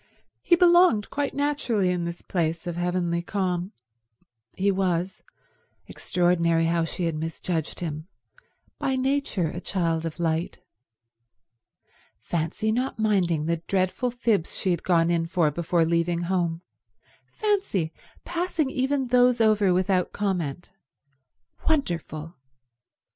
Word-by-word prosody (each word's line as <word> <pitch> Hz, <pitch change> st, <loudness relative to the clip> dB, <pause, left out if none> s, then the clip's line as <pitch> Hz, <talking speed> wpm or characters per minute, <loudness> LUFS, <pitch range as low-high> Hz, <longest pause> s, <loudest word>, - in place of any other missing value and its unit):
He 345 Hz, -, +4 dB
belonged 345 Hz, -, +5 dB
quite 285 Hz, 0 st, -2 dB
naturally 275 Hz, -10 st, +1 dB
in 175 Hz, -1 st, -1 dB
this 170 Hz, 0 st, -6 dB
place 165 Hz, -1 st, -1 dB
of 175 Hz, -1 st, -3 dB
heavenly 175 Hz, -1 st, 0 dB
calm. 180 Hz, 0 st, -2 dB, 0.8 s
He 200 Hz, +1 st, +2 dB
was—extraordinary 175 Hz, -2 st, -1 dB
how 165 Hz, 0 st, +1 dB
she 170 Hz, +3 st, -4 dB
had 165 Hz, -, 0 dB
misjudged 160 Hz, +1 st, -3 dB
him—by 165 Hz, -, -6 dB
nature 260 Hz, -, 0 dB
a 175 Hz, -, -6 dB
child 165 Hz, -4 st, -1 dB
of 165 Hz, -, -8 dB
light. 165 Hz, 0 st, -1 dB, 1.6 s
Fancy 170 Hz, +6 st, -2 dB
not 250 Hz, +3 st, -1 dB
minding 185 Hz, -8 st, +1 dB
the 170 Hz, +1 st, 0 dB
dreadful 190 Hz, +6 st, 0 dB
fibs 230 Hz, -7 st, 0 dB
she 185 Hz, -, 0 dB
had 170 Hz, -, -1 dB
gone 170 Hz, -2 st, +2 dB
in 165 Hz, -1 st, 0 dB
for 165 Hz, -3 st, +2 dB
before 170 Hz, +2 st, +1 dB
leaving 170 Hz, +1 st, +1 dB
home; 175 Hz, -2 st, -1 dB, 0.7 s
fancy 385 Hz, -, 0 dB, 0.3 s
passing 340 Hz, -5 st, -1 dB
even 265 Hz, 0 st, 0 dB
those 250 Hz, 0 st, +4 dB
over 215 Hz, -3 st, +4 dB
without 185 Hz, 0 st, +1 dB
comment. 175 Hz, -6 st, -2 dB, 1.0 s
Wonderful. 170 Hz, -, -2 dB
180 Hz, 115 wpm, -25 LUFS, 170-220 Hz, 1.6 s, belonged